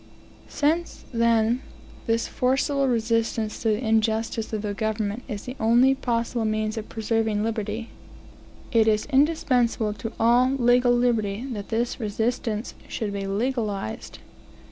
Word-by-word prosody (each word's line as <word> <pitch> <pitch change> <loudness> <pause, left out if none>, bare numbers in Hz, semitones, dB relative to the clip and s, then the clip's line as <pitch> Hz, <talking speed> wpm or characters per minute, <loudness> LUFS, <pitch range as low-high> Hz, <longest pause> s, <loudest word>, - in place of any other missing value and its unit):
Since, 320 +4 -1
then, 230 +1 +2 0.5
this 230 0 +1
forcible 270 +2 +1
resistance 230 -2 0
to - - -1
the 220 +2 0
injustice 220 0 0
of 215 -1 -3
the 205 -1 -2
government 215 +1 -2
is 205 -1 -5
the 255 - -7
only 240 +4 +5
possible 235 -3 -1
means 215 0 -1
of 220 -1 -6
preserving 220 -1 0
liberty, 220 0 -3 0.8
it 225 -2 +4
is 215 -1 +2
indispensable 250 -7 +2
to 225 +1 -6
all 245 +3 +4
legal 245 -1 +4
liberty 235 -3 +1
that 205 -3 -6
this 235 +3 -1
resistance 225 +1 -2
should 210 -4 -3
be 200 -1 -3
legalized. 210 - -2
225 Hz, 130 wpm, -25 LUFS, 215-245 Hz, 0.8 s, only